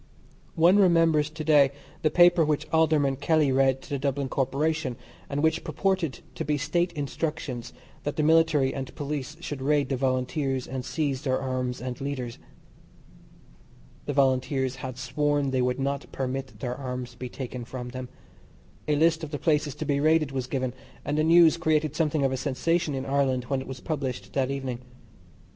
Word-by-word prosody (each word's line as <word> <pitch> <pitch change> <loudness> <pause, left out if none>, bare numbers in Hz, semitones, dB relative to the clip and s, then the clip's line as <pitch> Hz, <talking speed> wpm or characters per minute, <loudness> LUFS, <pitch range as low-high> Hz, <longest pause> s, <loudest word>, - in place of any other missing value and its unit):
One 175 +5 +5
remembers 165 -5 +4
to 155 0 -6
day 145 -3 +5 0.3
the 155 - +3
paper 175 0 +6
which 155 0 0
Alderman 155 -4 +3
Kelly 150 -1 +2
read 135 0 +2
to - - -13
the 140 - -1
Dublin 140 0 -1
Corporation, 140 +1 0 0.3
and 145 +1 -1
which 160 +1 +2
purported 190 -8 -1
to - - -4
be 150 +1 0
State 170 +5 0
Instructions 145 -4 -4 0.3
that 145 - -3
the 155 - 0
Military 155 -4 +4
and 135 -2 -6
Police 145 0 -4
should 145 -5 -5
raid 145 -1 +2
the 135 - +1
Volunteers, 130 +1 -1
and 130 0 -5
seize 140 -1 -2
their 130 -2 0
arms 130 -1 -2
and 125 0 -5
leaders. 130 -4 -4 1.7
The 145 - -1
Volunteers 130 -1 +1
had 130 -1 -6
sworn 140 +2 0
they 130 -1 +1
would 125 +1 0
not 140 +1 -2
permit 135 0 -4
their 125 -3 -2
arms 125 -2 -5
to 120 - -19
be 125 - -5
taken 125 -1 -6
from 125 +1 -6
them. 130 0 -7 0.8
A 150 - +2
list 165 +2 +3
of 155 - -4
the 145 - -3
places 150 -1 +1
to - - -4
be 140 -2 +1
raided 155 -1 +3
was 130 -2 -3
given, 130 -2 -2 0.3
and 145 - -1
the 155 - +2
news 165 0 +6
created 155 -3 +1
something 150 -2 +1
of 135 - +1
a 130 - -1
sensation 145 +3 0
in 135 0 -3
Ireland 135 -2 +1
when 135 -2 0
it - - -9
was 130 -1 -7
published 130 -10 -4
that 135 -1 +1
evening. 135 -3 -3
140 Hz, 180 wpm, -27 LUFS, 130-155 Hz, 1.7 s, paper